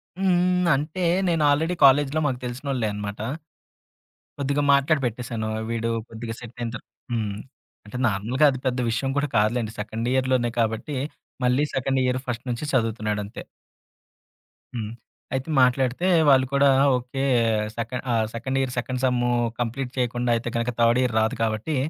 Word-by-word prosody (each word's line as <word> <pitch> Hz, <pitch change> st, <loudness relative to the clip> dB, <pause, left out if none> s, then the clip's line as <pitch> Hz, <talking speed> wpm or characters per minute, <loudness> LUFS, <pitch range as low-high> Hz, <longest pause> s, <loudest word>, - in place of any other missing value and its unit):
హ్మ్. 180 Hz, -1 st, +2 dB
అంటే 155 Hz, +6 st, -3 dB, 0.2 s
నేను 165 Hz, -3 st, +2 dB
ఆల్రెడీ 160 Hz, +5 st, +1 dB
కాలేజీలో 140 Hz, +2 st, +4 dB
మాకు 130 Hz, -3 st, -2 dB
తెలిసినోళ్ళే 125 Hz, -1 st, -2 dB
అనమాట. 105 Hz, 0 st, -5 dB, 1.2 s
కొద్దిగా 140 Hz, +1 st, 0 dB
మాట్లాడి 140 Hz, +2 st, +3 dB
పెట్టేశాను. 115 Hz, -1 st, -3 dB, 0.2 s
వీడు 115 Hz, 0 st, -1 dB, 0.2 s
కొద్దిగా 115 Hz, 0 st, -6 dB
సెట్ 120 Hz, -1 st, -11 dB
అయింత 115 Hz, -1 st, -3 dB, 0.4 s
హ్మ్. 110 Hz, -4 st, -2 dB, 0.5 s
అంటే 115 Hz, +4 st, -6 dB
నార్మల్‌గా 115 Hz, +7 st, +1 dB
అది 130 Hz, -, -4 dB
పెద్ద 125 Hz, 0 st, 0 dB
విషయం 135 Hz, +4 st, -1 dB
కూడా 145 Hz, +1 st, +1 dB
కాదులెండి. 110 Hz, +1 st, +1 dB
సెకండ్ 110 Hz, +3 st, -3 dB
ఇయర్‌లోనే 130 Hz, -2 st, +1 dB
కాబట్టి 110 Hz, +6 st, -1 dB, 0.5 s
మళ్ళీ 125 Hz, +3 st, +3 dB
సెకండ్ 135 Hz, 0 st, 0 dB
ఇయర్ 125 Hz, 0 st, 0 dB
ఫస్ట్ 120 Hz, -1 st, -4 dB
నుంచి 120 Hz, +4 st, -3 dB
చదువుతున్నాడంతే. 110 Hz, -4 st, -1 dB, 1.3 s
హ్మ్. 110 Hz, -3 st, -3 dB, 0.4 s
అయితే 130 Hz, +3 st, -2 dB
మాట్లాడితే 130 Hz, +6 st, +2 dB, 0.2 s
వాళ్ళు 130 Hz, -1 st, +5 dB
కూడా 140 Hz, 0 st, +5 dB, 0.3 s
ఓకే, 125 Hz, +2 st, -5 dB, 0.5 s
సెక 115 Hz, 0 st, -3 dB, 0.2 s
ఆహ్, 115 Hz, -2 st, +2 dB
second 130 Hz, +3 st, -2 dB
year 130 Hz, -2 st, -1 dB
second 125 Hz, +1 st, -2 dB
sem 120 Hz, -1 st, +2 dB, 0.3 s
complete 125 Hz, +2 st, -2 dB
చేయకుండా 120 Hz, -1 st, 0 dB
అయితే 115 Hz, +1 st, -2 dB
గనక 115 Hz, +1 st, 0 dB
థర్డ్ 115 Hz, +1 st, +4 dB
ఇయర్ 125 Hz, -3 st, 0 dB
రాదు 110 Hz, 0 st, +1 dB
కాబట్టి 110 Hz, +7 st, -1 dB
125 Hz, 140 wpm, -24 LUFS, 115-135 Hz, 1.3 s, వాళ్ళు